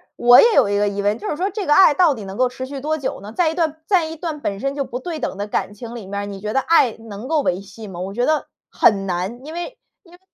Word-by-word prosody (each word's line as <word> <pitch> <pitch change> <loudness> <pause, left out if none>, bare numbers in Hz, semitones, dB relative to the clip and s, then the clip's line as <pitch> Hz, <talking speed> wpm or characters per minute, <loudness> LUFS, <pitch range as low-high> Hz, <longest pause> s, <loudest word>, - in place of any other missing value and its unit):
我 245 +1 +7
也 465 -1 +5
有 240 -7 +5
一 205 - +1
个 205 0 +2
疑 200 0 -2
问， 205 +2 +1
就 - - -5
是 - - -1
说 370 +6 -1
这 410 -2 -4
个 295 - +3
爱 375 -2 +7
到 335 -1 +4
底 220 - -8
能 195 0 -8
够 255 - +3
持 255 +1 -6
续 275 +1 -7
多 310 +3 -1
久 275 - -4
呢？ 205 +2 -9
在 340 +2 +2
一 - - -3
段 320 -2 -1
在 355 -2 +2
一 320 0 -6
段 320 -2 -5
本 200 -8 -3
身 275 +5 -2
就 280 -1 -2
不 250 - -5
对 330 +1 -5
等 195 - -3
的 205 +1 -3
感 205 - -2
情 230 +3 -9
里 225 -4 -8
面 200 +1 -4
儿， - - -4
你 200 -1 -7
觉 210 +2 -4
得 270 - +3
爱 265 -4 +3
能 225 +1 -9
够 315 0 +1
维 180 -9 0
系 205 +2 -11
吗？ 180 -3 -8
我 190 +2 -5
觉 245 +3 0
得 310 -1 0 0.2
很 195 -2 +3
难， 190 +6 -3
因 310 - -8
为 350 +9 -6 0.3
因 345 -3 -20
为 355 - -17
250 Hz, 335 characters per minute, -20 LUFS, 205-315 Hz, 0.3 s, 我